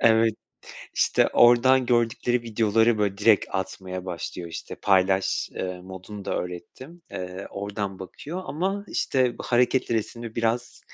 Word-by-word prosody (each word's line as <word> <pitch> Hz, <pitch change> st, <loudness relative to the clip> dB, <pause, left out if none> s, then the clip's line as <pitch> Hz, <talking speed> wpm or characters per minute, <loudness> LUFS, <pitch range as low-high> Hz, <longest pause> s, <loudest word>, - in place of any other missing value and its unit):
Evet, 110 Hz, -1 st, +4 dB, 0.6 s
işte, -, -, +3 dB
oradan 125 Hz, +2 st, +6 dB
gördükleri 120 Hz, 0 st, +1 dB
videoları, 110 Hz, 0 st, +2 dB
böyle, 100 Hz, -2 st, 0 dB
direkt 105 Hz, -1 st, +5 dB
atmaya 95 Hz, -1 st, -4 dB
başlıyor, 90 Hz, -1 st, -5 dB
işte, 80 Hz, -, -7 dB
paylaş, 95 Hz, -1 st, +2 dB
ııı, 90 Hz, -1 st, -4 dB
modunu 95 Hz, +2 st, -9 dB
da -, -, -2 dB
öğrettim. 130 Hz, -, -9 dB
Iıı, 90 Hz, +1 st, -6 dB
oradan 100 Hz, -1 st, -4 dB
bakıyor 145 Hz, -, -7 dB
ama, 195 Hz, +6 st, -2 dB
işte, 130 Hz, -3 st, +1 dB
hareketli 125 Hz, 0 st, +2 dB
resimle 115 Hz, +1 st, -4 dB
biraz, 115 Hz, +1 st, -1 dB
110 Hz, 125 wpm, -25 LUFS, 95-120 Hz, 0.6 s, oradan